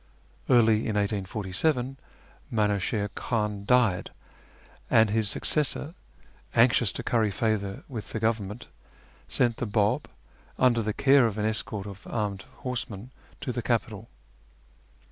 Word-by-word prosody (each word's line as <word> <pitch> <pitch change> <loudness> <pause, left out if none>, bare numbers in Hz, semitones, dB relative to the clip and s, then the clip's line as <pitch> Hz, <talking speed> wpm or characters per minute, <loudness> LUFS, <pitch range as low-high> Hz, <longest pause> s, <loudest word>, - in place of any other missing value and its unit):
Early 115 -3 +4
in 110 - -1
1847 105 - -1 0.6
Minuchiln 105 -1 0
Khan 105 -3 -2
died, 115 -6 +3 0.8
and 110 -2 +5
his 110 -1 +3
successor, 150 +6 0 0.6
anxious - - +4
to - - -3
curry 110 -3 +2
favour 100 -2 -1
with 115 -6 -7
the 110 - -3
Government, 110 0 -2 0.6
sent 120 -2 +1
the 125 - -3
Bab, 105 0 +1 0.5
under 120 -2 +4
the 110 -1 -1
care 135 -1 +5
of 110 -2 -4
an 105 - 0
escort 110 -2 -2
of 100 0 -10
armed 105 -3 -2 0.2
horsemen, 125 -3 -4 0.3
to 125 - -2
the 120 - -3
capital. 115 -2 -2
110 Hz, 125 wpm, -27 LUFS, 105-120 Hz, 0.8 s, and